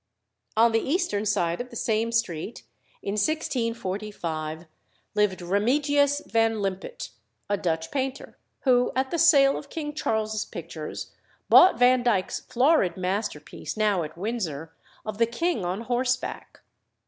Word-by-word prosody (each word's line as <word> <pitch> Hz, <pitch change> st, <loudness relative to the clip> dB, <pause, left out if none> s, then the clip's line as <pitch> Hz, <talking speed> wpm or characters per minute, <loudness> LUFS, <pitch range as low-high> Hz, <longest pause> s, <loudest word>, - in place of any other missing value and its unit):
On 230 Hz, +1 st, +6 dB
the 225 Hz, -, +3 dB
eastern 220 Hz, -, 0 dB
side 175 Hz, -2 st, 0 dB
of 250 Hz, -, -8 dB
the 240 Hz, -, -12 dB
same 225 Hz, 0 st, 0 dB
street, 225 Hz, -4 st, -2 dB, 0.4 s
in 200 Hz, -, -2 dB
1645, 205 Hz, -, -2 dB, 0.5 s
lived 210 Hz, -3 st, +1 dB
Remigius 285 Hz, +9 st, +2 dB
van 225 Hz, 0 st, +2 dB
Limput, 200 Hz, -, -4 dB, 0.4 s
a 205 Hz, -, +1 dB
Dutch 165 Hz, -4 st, -2 dB
painter, 270 Hz, -1 st, -3 dB, 0.3 s
who, 250 Hz, -2 st, +3 dB
at 265 Hz, 0 st, 0 dB
the 340 Hz, -, -1 dB
sale 280 Hz, -5 st, +6 dB
of 280 Hz, -, -13 dB
King 300 Hz, -2 st, -4 dB
Charles's 220 Hz, -6 st, -1 dB
pictures, 160 Hz, -2 st, -7 dB, 0.4 s
bought 370 Hz, -, +8 dB
Vandyke's 245 Hz, -5 st, +3 dB
florid 250 Hz, -, +2 dB
masterpiece, 185 Hz, -4 st, -4 dB
now 210 Hz, -4 st, +2 dB
at 155 Hz, +1 st, -6 dB
Windsor, 175 Hz, -7 st, -4 dB, 0.3 s
of 215 Hz, 0 st, -5 dB
the 230 Hz, -, +4 dB
king 235 Hz, -, -1 dB
on 180 Hz, +4 st, -2 dB
horseback. 250 Hz, +2 st, -2 dB
225 Hz, 130 wpm, -26 LUFS, 185-255 Hz, 0.5 s, bought